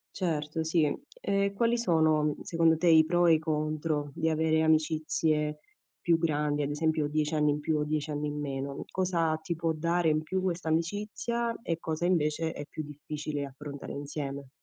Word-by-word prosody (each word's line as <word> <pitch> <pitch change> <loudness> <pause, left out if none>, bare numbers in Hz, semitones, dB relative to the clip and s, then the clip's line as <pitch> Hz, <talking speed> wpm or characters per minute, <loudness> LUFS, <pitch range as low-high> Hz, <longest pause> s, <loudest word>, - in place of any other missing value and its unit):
Certo, 160 -3 -1
sì. 160 -2 +2 0.2
E 200 - 0
quali 235 +2 +2
sono 160 -8 +2
secondo 165 -1 +3
te 170 - -2
i 160 -1 +8
pro 175 +2 +2
e 170 - +6
i 160 - +4
contro 155 -1 -1
di 160 +3 0
avere 160 0 +2
amicizie 155 -1 +1 0.4
più 170 -2 +2
grandi? 150 -2 0
Ad 145 - -1
esempio, 155 0 0
10 150 +1 -1
anni 150 -1 +3
in 145 0 +1
più 155 +1 0
o 150 - +1
10 150 0 -2
anni 150 0 -2
in 150 0 -4
meno. 140 -1 -4
Cosa 170 -4 +1
ti 170 +2 -3
può 165 0 0
dare 170 +1 +1
in 155 0 +2
più 185 +4 -2
questa 175 -3 -1
amicizia, 210 +8 -1
e 165 -1 -2
cosa 160 +1 -2
invece 160 -2 +1
è - - -6
più 155 - -5
difficile 150 0 -5
affrontare 140 +1 -8
insieme? 140 -1 -5
155 Hz, 180 wpm, -29 LUFS, 150-165 Hz, 0.4 s, i